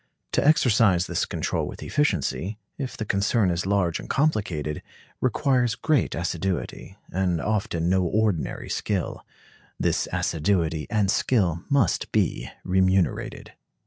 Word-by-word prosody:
To - - +2
exercise 115 - +4
this - - -1
control - - -2
with - - -8
efficiency, 105 - 0 0.2
if 135 -3 -4
the 110 - -3
concern 100 0 +2
is 85 +2 -2
large 90 -4 +1
and - - -9
complicated, 95 - 0 0.4
requires 125 -2 +1
great 155 -4 +1
assiduity, 95 +3 -3
and 90 -2 0
often 95 -5 -1
no 95 +1 +3
ordinary 100 -2 0
skill. 100 -4 -2 0.6
This - - +1
assiduity 80 -2 0
and 105 -3 +2
skill 90 -9 +1
must 140 - +1
be - - 0
remunerated. 95 0 0
95 Hz, 120 wpm, -25 LUFS, 85-110 Hz, 0.6 s, exercise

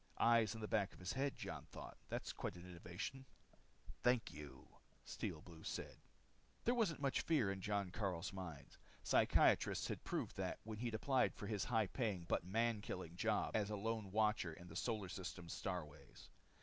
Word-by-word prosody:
Eyes 115 -2 +5
in 110 - -6
the 110 - -2
back 105 -3 +2
of - - -14
his 90 0 -2
head, 135 +1 0
Jon - - -5
thought. - - -8
That's - - -2
quite - - -3
an 90 +1 -9
innovation. 90 +9 -5 0.8
"Thank 125 -1 +3
you," 75 -3 -9 0.4
Steel 75 - -3
Blue 85 -2 -11
said. - - -3 0.7
There 240 - +4
wasn't 205 - +2
much 135 - +3
fear 140 -12 +3
in 95 -1 -4
Jon 100 -1 0
Karyl's 95 -2 -1
mind. 80 -8 -7 0.3
Psychiatrists - - +4
had - - -3
proved - - -2
that - - -1
when 110 -1 -5
he 120 - 0
had 115 - -1
applied 130 +3 +3
for 100 - -5
this 105 -2 0
high 110 -1 +3
paying 100 -2 -1
but - - +2
man 110 +3 +1
killing 90 -4 -5
job 110 +3 +1
as 105 -2 +2
a 105 - -1
Lone 110 0 -1
Watcher 105 -6 +2
on 90 0 -10
the 80 - -9
Solar 110 -1 0
System's 90 -4 -5
starways. 75 -7 -5
100 Hz, 185 wpm, -42 LUFS, 90-115 Hz, 0.8 s, Eyes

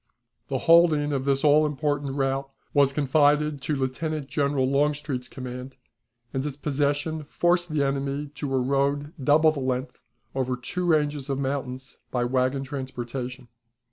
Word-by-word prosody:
The - - -1
holding 160 -3 +5
of 135 -1 -1
this 135 -1 +1
all 150 +1 +6
important 145 -2 -1
route 135 0 -1 0.2
was 140 -2 +4
confided 145 +1 +2
to 150 - -1
Lieutenant 140 +3 -2
General 140 -3 +1
Longstreet's 140 -2 0
command, 125 +1 -8 0.6
and 135 - -1
its 145 -2 -4
possession 145 +2 -1
forced 175 +4 +1
the 150 -2 +1
enemy 140 +1 -1
to 145 -1 -5
a 135 - +2
road 140 +3 0
double 155 +3 +5
the 150 - -5
length, 130 +1 -2 0.3
over 130 -1 -1
two 180 +8 -3
ranges 150 -3 +1
of 135 - 0
mountains, 130 -1 -4
by 125 -1 0
wagon 130 +2 +1
transportation. 130 -2 -5
140 Hz, 145 wpm, -26 LUFS, 130-150 Hz, 0.6 s, all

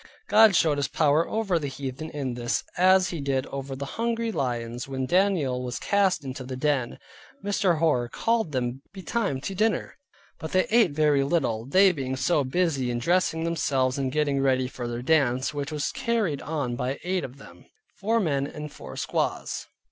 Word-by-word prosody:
God 220 -3 +7
showed 160 -3 +3
His 140 - 0
power 155 +1 +2
over 205 -6 0
the 145 - -3
heathen 135 +3 -6
in 140 -5 -3
this, 120 0 -1
as 185 +1 +4
He 170 -4 -4
did 135 -1 0
over 135 0 -6
the 140 +1 -5
hungry 230 +6 -2
lions 120 - -3
when 130 -1 -3
Daniel 175 -7 +1
was 125 -1 -4
cast 195 -5 +1
into 130 0 -5
the 130 0 -6
den. 135 -2 0 0.5
Mr. 195 -4 +2
Hoar 140 -7 +1
called 225 - 0
them 130 -1 -2
betime 195 - -2
to 195 - -3
dinner, 215 +8 -1 0.4
but 160 - -6
they 185 0 +3
ate 225 -4 +5
very 145 -1 +2
little, 130 -7 0
they 190 +6 +5
being 135 -5 -3
so 145 +2 +1
busy 135 -2 0
in 120 - -1
dressing 170 +3 +1
themselves, 140 -6 0
and 135 -1 -1
getting 145 -1 +1
ready 130 -1 +2
for 125 -1 -6
their 120 0 -4
dance, 130 -3 +2
which 145 0 -4
was 150 -1 -2
carried 215 -12 -1
on 145 -6 -2
by 130 +3 -2
eight 185 0 -1
of 130 +1 -8
them, 90 -10 -15 0.3
four 225 +4 +1
men 140 -8 0
and 150 0 -7
four - - -10
squaws. - - -2
145 Hz, 185 wpm, -26 LUFS, 130-180 Hz, 0.5 s, God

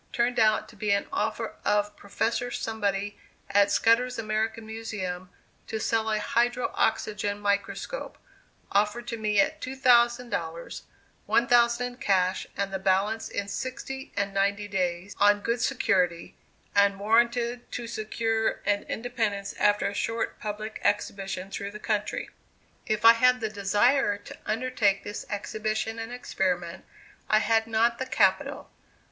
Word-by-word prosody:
turned 245 -1 +1
out 215 -1 +3
to - - -15
be 210 0 -3
an 200 0 +2
offer 375 - -2
of 205 0 +1
Professor 230 +4 -2
Somebody 205 -3 -2 0.3
at 200 0 +5
Scudder's 245 +2 +3
American 220 0 -2
Museum 205 -5 -5 0.4
to 220 - -3
sell 220 0 0
a 215 - +1
hydro 240 +3 0
oxygen 205 -2 0
microscope, 205 - -2 0.5
offered 210 +4 +1
to 230 - -3
me 210 -2 +1
at 195 - +2
two 260 +1 -5
thousand 240 -2 +4
dollars 165 0 -4 0.5
one 235 - +3
thousand 240 0 +4
in 245 0 -6
cash 185 -4 +1
and 200 0 -2
the 190 - -1
balance 195 +4 +1
in 200 - -3
sixty 265 +4 -5
and 200 -1 -1
ninety 200 +1 0
days, 185 -1 -2
on 205 0 +5
good 235 +3 -1
security, 180 -10 +1 0.4
and 200 -1 +3
warranted 235 +3 +1
to 240 - -4
secure 225 0 -1
an 205 0 +2
independence 220 -4 -2
after 205 0 +3
a 200 - -3
short 225 +2 -2
public 215 +1 -5
exhibition 195 -2 -1
through 200 0 -4
the 205 - -8
country. 210 -1 -2 0.6
If 215 0 0
I 230 - +11
had 250 +2 +4
the 220 -2 -2
desire 205 +3 +2
to - - -12
undertake 220 -3 +1
this 205 - -6
exhibition 215 +2 -3
and 225 +1 -5
experiment, 185 -7 -2 0.4
I 215 - +5
had 225 0 +2
not 230 +1 +2
the 260 - -3
capital. 190 -6 +1
215 Hz, 145 wpm, -27 LUFS, 200-235 Hz, 0.6 s, I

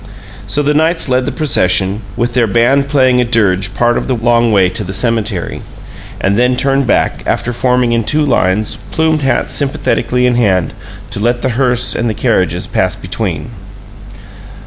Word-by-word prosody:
So 150 - 0
the 145 +1 +1
Knights 160 0 +2
led 130 0 +1
the - - -1
procession, 105 - +1 0.2
with 120 0 -1
their 120 -2 +2
band 120 +6 +2
playing 130 -3 +2
a - - +3
dirge 100 -5 0
part 120 0 +1
of - - -6
the 130 - 0
long 120 0 +2
way 95 -3 +4
to 105 +4 -4
the 95 0 -6
cemetery; 110 -5 -2 0.6
and 100 +3 0
then 125 +1 +2
turned 135 +1 +1
back, - - 0
after 120 - -1
forming 125 0 +1
in 115 -1 +1
two 150 +7 +1
lines, 105 -5 0
plumed 160 -1 0
hats 130 -3 0
sympathetically 135 -3 0
in 125 - +2
hand, 95 -7 +1 0.4
to - - -4
let 120 +3 -1
the 130 - +1
hearse 125 0 +1
and 120 +1 -1
the 110 - -3
carriages - - 0
pass - - -1
between. - - -4
120 Hz, 175 wpm, -13 LUFS, 110-135 Hz, 0.6 s, way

